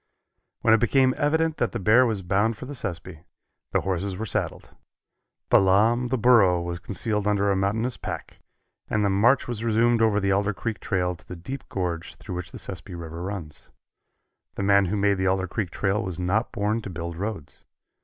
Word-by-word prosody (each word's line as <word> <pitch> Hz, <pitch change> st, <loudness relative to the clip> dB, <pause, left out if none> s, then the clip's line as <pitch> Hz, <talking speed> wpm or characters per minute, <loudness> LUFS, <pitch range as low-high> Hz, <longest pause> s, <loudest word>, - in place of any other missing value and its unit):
When 110 Hz, -, +5 dB
it 115 Hz, -, +5 dB
became 130 Hz, +3 st, +3 dB
evident 160 Hz, +2 st, +1 dB
that 120 Hz, -, -1 dB
the -, -, -2 dB
bear 110 Hz, +6 st, +5 dB
was 105 Hz, -4 st, -2 dB
bound 100 Hz, +5 st, +1 dB
for -, -, -8 dB
the 145 Hz, -, -7 dB
Sespe, 90 Hz, -, -6 dB, 0.5 s
the -, -, +2 dB
horses 95 Hz, 0 st, -2 dB
were 110 Hz, -, -3 dB
saddled. -, -, -3 dB, 0.8 s
Balaam 110 Hz, +6 st, +4 dB
the 130 Hz, +2 st, 0 dB
Burro 110 Hz, -7 st, +5 dB
was 85 Hz, 0 st, -4 dB
concealed 105 Hz, +3 st, -2 dB
under 100 Hz, -1 st, +2 dB
a -, -, +2 dB
mountainous 110 Hz, +6 st, 0 dB
pack, -, -, -7 dB, 0.5 s
and 105 Hz, -1 st, +1 dB
the 100 Hz, -, +2 dB
march 115 Hz, +8 st, +3 dB
was 115 Hz, -2 st, -4 dB
resumed 115 Hz, +1 st, +3 dB
over 110 Hz, -2 st, +3 dB
the 100 Hz, -1 st, +1 dB
Alder 100 Hz, +1 st, +1 dB
Creek 115 Hz, +1 st, -4 dB
trail 90 Hz, -3 st, -1 dB
to 85 Hz, -, -21 dB
the 90 Hz, -, -7 dB
deep 130 Hz, +11 st, -8 dB
gorge 85 Hz, -3 st, -3 dB
through -, -, -8 dB
which 90 Hz, 0 st, -5 dB
the -, -, -8 dB
Sespe 95 Hz, +1 st, -8 dB
River 85 Hz, 0 st, -7 dB
runs. 90 Hz, -5 st, -6 dB, 0.9 s
The -, -, -3 dB
man 100 Hz, 0 st, +4 dB
who 100 Hz, +4 st, -1 dB
made 100 Hz, -1 st, +2 dB
the 95 Hz, -, +1 dB
Alder 95 Hz, 0 st, +1 dB
Creek 95 Hz, +1 st, -3 dB
trail 100 Hz, +3 st, 0 dB
was 95 Hz, -6 st, -4 dB
not 95 Hz, +6 st, 0 dB
born 105 Hz, +3 st, -1 dB
to 105 Hz, -, -7 dB
build 85 Hz, -1 st, -5 dB
roads. 95 Hz, -5 st, -6 dB
100 Hz, 195 wpm, -25 LUFS, 90-115 Hz, 0.9 s, When